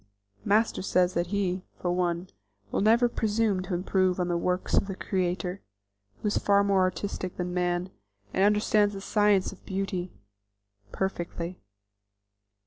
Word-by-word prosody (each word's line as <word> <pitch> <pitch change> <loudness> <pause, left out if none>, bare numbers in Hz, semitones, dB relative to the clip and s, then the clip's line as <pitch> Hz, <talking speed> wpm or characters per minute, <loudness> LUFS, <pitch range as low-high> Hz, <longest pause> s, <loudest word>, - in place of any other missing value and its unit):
Master 215 +3 +2
says 180 -1 +2
that 175 0 0
he, 190 -1 -1 0.2
for 175 - -1
one, 175 0 0 0.4
will - - 0
never 230 +4 +5
presume 220 -4 0
to 185 0 -3
improve 185 0 +1
on 180 0 0
the 175 - +1
works 180 +2 -1
of - - +2
the 195 - -4
Creator, 185 0 -2 0.6
who - - +1
is 205 - +1
far 200 0 +4
more 200 -1 +3
artistic 185 0 -2
than 180 0 -3
man, 180 +1 0 0.4
and 190 - +2
understands 210 0 +3
the 195 - -6
science 205 -2 +2
of 195 - -15
beauty 190 -2 -3 0.8
perfectly. 175 -2 -3
190 Hz, 145 wpm, -28 LUFS, 180-200 Hz, 0.8 s, never